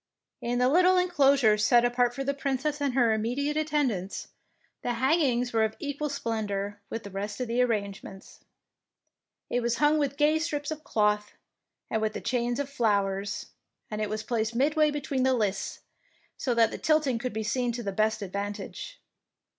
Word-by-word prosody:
In 240 Hz, +1 st, -1 dB
the 250 Hz, 0 st, +3 dB
little 360 Hz, +6 st, +5 dB
enclosure 275 Hz, -11 st, +4 dB
set 240 Hz, +3 st, +5 dB
apart 245 Hz, 0 st, +1 dB
for 275 Hz, -, -3 dB
the 280 Hz, +1 st, 0 dB
Princess 280 Hz, +2 st, -2 dB
and 275 Hz, -3 st, 0 dB
her 240 Hz, -4 st, +4 dB
immediate 250 Hz, +7 st, -1 dB
attend 300 Hz, -4 st, +1 dB
ants, 190 Hz, -1 st, -5 dB, 0.5 s
the 245 Hz, -, -1 dB
hangings 255 Hz, -2 st, +2 dB
were 225 Hz, -1 st, +3 dB
of 220 Hz, 0 st, -1 dB
equal 290 Hz, +1 st, -3 dB
splen 230 Hz, -6 st, -2 dB
dour 200 Hz, +1 st, -4 dB
with 225 Hz, -, -5 dB
the 200 Hz, -, -9 dB
rest 200 Hz, +4 st, -4 dB
of 250 Hz, -, -2 dB
the 235 Hz, +2 st, +1 dB
arrangements. 200 Hz, -4 st, -3 dB, 1.1 s
It 245 Hz, -, +2 dB
was 235 Hz, 0 st, 0 dB
hung 300 Hz, +3 st, +3 dB
with 280 Hz, -1 st, -1 dB
gay 305 Hz, +1 st, +3 dB
strips 295 Hz, -2 st, -2 dB
of 310 Hz, 0 st, -5 dB
cloth, 210 Hz, -1 st, +1 dB, 0.5 s
and 220 Hz, -, -1 dB
with 215 Hz, 0 st, -2 dB
chains 240 Hz, 0 st, 0 dB
of 285 Hz, -, -1 dB
flowers, 205 Hz, -6 st, -1 dB, 0.4 s
and 215 Hz, 0 st, -3 dB
it 210 Hz, -, -1 dB
was 215 Hz, 0 st, -3 dB
placed 230 Hz, -1 st, -1 dB
midway 300 Hz, +4 st, +3 dB
between 285 Hz, -2 st, -2 dB
the 260 Hz, 0 st, +3 dB
lists, 205 Hz, -4 st, -2 dB, 0.5 s
so 245 Hz, -3 st, -1 dB
that 230 Hz, -1 st, +4 dB
the -, -, -6 dB
tilting 300 Hz, -6 st, +2 dB
could 250 Hz, +1 st, -3 dB
be 220 Hz, +1 st, -2 dB
seen 245 Hz, +3 st, 0 dB
to 240 Hz, 0 st, -4 dB
the 200 Hz, -, -2 dB
best 215 Hz, +2 st, 0 dB
advantage. 205 Hz, -, -5 dB
245 Hz, 180 wpm, -28 LUFS, 215-280 Hz, 1.1 s, little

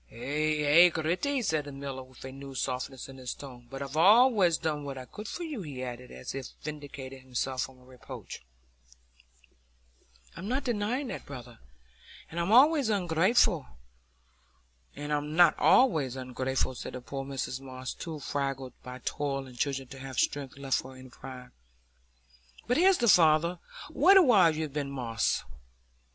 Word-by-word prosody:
"Ay, 150 Hz, +5 st, -1 dB
ay, 170 Hz, +5 st, +8 dB
Gritty," 180 Hz, -, -1 dB
said 155 Hz, -8 st, 0 dB
the 145 Hz, -, -7 dB
miller, 135 Hz, -1 st, -6 dB
with 130 Hz, 0 st, -13 dB
a 130 Hz, -, -6 dB
new 135 Hz, 0 st, -9 dB
softness 130 Hz, 0 st, -3 dB
in 135 Hz, 0 st, -11 dB
his 125 Hz, -1 st, -5 dB
tone; 125 Hz, -4 st, -11 dB
"but 135 Hz, +1 st, -5 dB
I've 140 Hz, +1 st, -7 dB
allays 200 Hz, 0 st, +6 dB
done 150 Hz, -2 st, -2 dB
what 140 Hz, -1 st, -6 dB
I 130 Hz, -, -7 dB
could 210 Hz, -, -9 dB
for 350 Hz, -, -5 dB
you," 300 Hz, -9 st, -5 dB
he 140 Hz, -7 st, -6 dB
added, 125 Hz, 0 st, -7 dB
as 65 Hz, 0 st, -7 dB
if 135 Hz, -1 st, -5 dB, 0.2 s
vindicating 140 Hz, -3 st, -7 dB
himself 130 Hz, 0 st, -2 dB
from 130 Hz, -1 st, -5 dB
a 125 Hz, -, -20 dB
reproach. 125 Hz, -1 st, -10 dB, 1.9 s
"I'm 190 Hz, -, -7 dB
not 260 Hz, +5 st, -1 dB
denying 240 Hz, +3 st, -1 dB
that, -, -, -7 dB
brother, 125 Hz, -4 st, -10 dB, 0.7 s
and 170 Hz, -, -4 dB
I'm 170 Hz, +2 st, 0 dB
noways 275 Hz, +2 st, +6 dB
ungrateful," 185 Hz, -, +2 dB, 1.3 s
said 145 Hz, +1 st, -5 dB
poor 145 Hz, -1 st, +1 dB, 2.2 s
Mrs 130 Hz, +1 st, -6 dB
Moss, 130 Hz, -1 st, -6 dB
too 160 Hz, -2 st, -6 dB
fagged 135 Hz, -3 st, -3 dB
by 125 Hz, 0 st, -9 dB
toil 135 Hz, -2 st, -2 dB
and 130 Hz, -1 st, -13 dB
children 135 Hz, +1 st, -2 dB
to 135 Hz, -1 st, -10 dB
have 130 Hz, -2 st, -8 dB
strength 140 Hz, -2 st, -1 dB
left 135 Hz, -2 st, 0 dB
for 130 Hz, 0 st, -9 dB
any 130 Hz, 0 st, -12 dB
pride. 125 Hz, 0 st, -10 dB, 1.1 s
"But 245 Hz, +3 st, +1 dB
here's 370 Hz, +2 st, +5 dB
the 240 Hz, -, +1 dB
father. 170 Hz, -1 st, +5 dB, 0.3 s
What 375 Hz, +7 st, +6 dB
a 380 Hz, -, +8 dB
while 190 Hz, -, +5 dB
you've 155 Hz, -3 st, -3 dB
been, 145 Hz, -2 st, -2 dB
Moss!" 115 Hz, -5 st, -1 dB
140 Hz, 155 wpm, -29 LUFS, 130-175 Hz, 2.2 s, ay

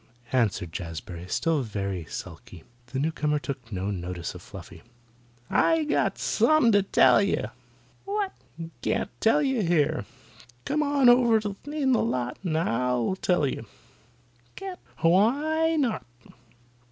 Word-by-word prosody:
answered 105 Hz, -9 st, 0 dB
Jazbury, 85 Hz, 0 st, -7 dB
still 160 Hz, -, +1 dB
very 100 Hz, -6 st, -4 dB
sulky. 85 Hz, +1 st, -9 dB, 0.2 s
The 130 Hz, -, -5 dB
newcomer 150 Hz, +1 st, 0 dB
took 135 Hz, -5 st, -6 dB
no 95 Hz, +1 st, -2 dB
notice 90 Hz, -2 st, -5 dB
of 90 Hz, -, -10 dB
Fluffy. 85 Hz, -4 st, -11 dB, 0.7 s
"I 325 Hz, -1 st, +3 dB
got 300 Hz, -, 0 dB
sumpin' 310 Hz, -7 st, +3 dB
to 205 Hz, -1 st, +5 dB
tell 195 Hz, -, +5 dB
you." -, -, 0 dB, 0.6 s
"What?" 400 Hz, -1 st, -2 dB, 0.5 s
"Can't -, -, -1 dB
tell 290 Hz, +7 st, +4 dB
you 265 Hz, -4 st, +1 dB
here. 155 Hz, -, +1 dB, 0.6 s
Come 300 Hz, +2 st, 0 dB
on 285 Hz, -3 st, +3 dB
over 240 Hz, -2 st, +6 dB, 0.3 s
in 290 Hz, -2 st, 0 dB
the 245 Hz, -, +3 dB
lot 125 Hz, +1 st, -2 dB
and 160 Hz, -4 st, 0 dB
I'll 125 Hz, 0 st, 0 dB
tell 180 Hz, -5 st, +1 dB
you." 115 Hz, -4 st, -4 dB, 0.9 s
"Can't." 380 Hz, -2 st, -7 dB, 0.2 s
"Why 290 Hz, -, +3 dB
not?" 265 Hz, -8 st, 0 dB
160 Hz, 130 wpm, -26 LUFS, -, 0.9 s, over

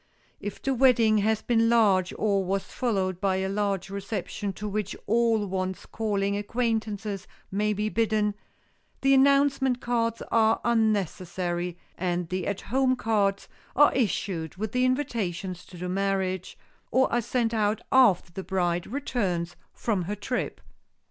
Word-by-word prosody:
If 205 Hz, 0 st, -6 dB
the 270 Hz, -, +1 dB
wedding 235 Hz, -4 st, +4 dB
has 220 Hz, +1 st, +1 dB
been 230 Hz, -1 st, +3 dB
large 200 Hz, -6 st, +4 dB
or 200 Hz, -2 st, +1 dB
was 195 Hz, +1 st, -1 dB
followed 190 Hz, -7 st, -2 dB
by 195 Hz, -1 st, +2 dB
a 190 Hz, 0 st, -1 dB
large 195 Hz, -1 st, -1 dB
reception 200 Hz, 0 st, -4 dB
to 210 Hz, +3 st, -6 dB
which 205 Hz, -1 st, -3 dB
all 225 Hz, -1 st, +2 dB
one's 185 Hz, -1 st, -3 dB
calling 200 Hz, -2 st, -1 dB
acquaintances 215 Hz, -2 st, -2 dB, 0.2 s
may 210 Hz, +2 st, +1 dB
be 210 Hz, +1 st, -1 dB
bidden, 215 Hz, -1 st, +1 dB, 0.7 s
the 270 Hz, 0 st, +4 dB
announcement 275 Hz, -1 st, +4 dB
cards 230 Hz, -2 st, -1 dB
are 225 Hz, 0 st, +4 dB
unnecessary 185 Hz, -6 st, 0 dB, 0.2 s
and 175 Hz, -1 st, -1 dB
the 185 Hz, -1 st, -2 dB
"At 200 Hz, -1 st, -2 dB
Home" 260 Hz, +1 st, +1 dB
cards 205 Hz, -5 st, 0 dB, 0.3 s
are 290 Hz, +2 st, +6 dB
issued 190 Hz, -, -1 dB
with 210 Hz, +2 st, -4 dB
the 250 Hz, 0 st, +2 dB
invitations 200 Hz, -9 st, -2 dB
to 180 Hz, -, -12 dB
the 180 Hz, +1 st, -4 dB
marriage, 190 Hz, -1 st, -1 dB, 0.3 s
or 260 Hz, -1 st, +2 dB
are 240 Hz, -, +3 dB
sent 235 Hz, 0 st, 0 dB
out 215 Hz, 0 st, +1 dB
after 225 Hz, -10 st, +5 dB
the 190 Hz, -, -4 dB
bride 175 Hz, -2 st, -1 dB
returns 195 Hz, -10 st, -2 dB, 0.2 s
from 200 Hz, -7 st, -1 dB
her 205 Hz, +4 st, -3 dB
trip. 245 Hz, +5 st, -3 dB
210 Hz, 145 wpm, -27 LUFS, 190-230 Hz, 0.7 s, are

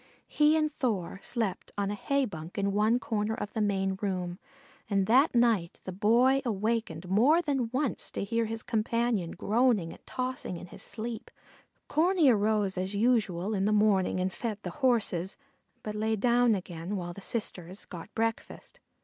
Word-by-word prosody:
He 300 Hz, +1 st, +3 dB
and 305 Hz, -1 st, 0 dB
Thor 200 Hz, -, -2 dB
slept 215 Hz, -6 st, -3 dB
on 200 Hz, 0 st, 0 dB
a -, -, -1 dB
hay 275 Hz, +6 st, 0 dB
bunk 165 Hz, -5 st, -8 dB
in 200 Hz, 0 st, +1 dB
one 215 Hz, +4 st, +3 dB
corner 220 Hz, -3 st, -1 dB
of 205 Hz, -, -5 dB
the 220 Hz, -, -1 dB
main 195 Hz, -2 st, 0 dB
room, 180 Hz, -3 st, -2 dB, 0.5 s
and 195 Hz, -2 st, +2 dB
that 255 Hz, +7 st, +4 dB
night 225 Hz, -8 st, +2 dB
the 185 Hz, -, -5 dB
Boy 235 Hz, +8 st, +3 dB
awakened 215 Hz, -, -2 dB
more 240 Hz, -, +4 dB
than 275 Hz, -8 st, -1 dB
once 260 Hz, +2 st, -1 dB
to -, -, -2 dB
hear 230 Hz, +3 st, 0 dB
his 225 Hz, 0 st, -4 dB
companion 230 Hz, -4 st, 0 dB
groaning 210 Hz, -3 st, +1 dB
and -, -, -17 dB
tossing 255 Hz, -8 st, -3 dB
in 175 Hz, -, -8 dB
his 175 Hz, -, -11 dB
sleep. 225 Hz, 0 st, -6 dB, 0.6 s
Corney 330 Hz, -1 st, +3 dB
arose 210 Hz, -3 st, +1 dB
as 190 Hz, +2 st, -3 dB
usual 215 Hz, -4 st, +1 dB
in 195 Hz, -1 st, 0 dB
the 210 Hz, -, +2 dB
morning 205 Hz, -3 st, +3 dB
and 185 Hz, +1 st, -1 dB
fed 225 Hz, -4 st, -3 dB
the -, -, -4 dB
horses, 205 Hz, -8 st, +1 dB, 0.5 s
but 210 Hz, -, -4 dB
lay 220 Hz, +1 st, 0 dB
down 240 Hz, +1 st, +3 dB
again 180 Hz, 0 st, -5 dB
while 175 Hz, -2 st, -4 dB
the 200 Hz, -, -10 dB
sisters 190 Hz, -4 st, -3 dB
got 175 Hz, +3 st, -9 dB
breakfast. 225 Hz, 0 st, -3 dB
215 Hz, 170 wpm, -29 LUFS, 190-240 Hz, 0.6 s, that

